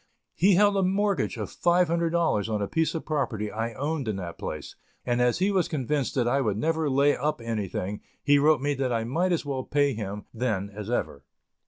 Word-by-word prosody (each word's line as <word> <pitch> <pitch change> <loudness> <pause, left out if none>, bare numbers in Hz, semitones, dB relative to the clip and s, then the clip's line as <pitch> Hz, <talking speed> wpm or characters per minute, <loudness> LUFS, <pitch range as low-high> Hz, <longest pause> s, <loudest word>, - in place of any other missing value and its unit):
He 190 +2 +4
held 205 +1 +4
a - - +3
mortgage 195 +2 +1
of - - -5
five 175 +1 +3
hundred 170 +1 +1
dollars 160 - +1
on 105 -1 0
a 100 - -1
piece 160 - 0
of 160 - -4
property 130 -9 -2
I 115 +1 -3
owned 145 +1 -2
in 110 - -1
that 90 -3 -6
place, 75 -1 -6 0.3
and, 120 0 +1
as 125 -1 +3
he 190 +3 +2
was 190 -3 +2
convinced 145 -2 -1
that 125 -3 +1
I 140 +3 +2
would 105 -5 0
never 160 +4 0
lay 140 +2 +3
up 150 0 -1
anything, 105 -3 -3 0.2
he 145 0 +5
wrote 150 -1 +4
me 145 +1 +1
that 135 -2 -1
I 115 -1 0
might 165 +11 0
as 170 -3 0
well 135 -2 -2
pay 145 0 +1
him 105 -2 -5
then 105 -4 -2
as 105 +1 -7
ever. 75 - -2
140 Hz, 220 wpm, -26 LUFS, 110-160 Hz, 0.3 s, he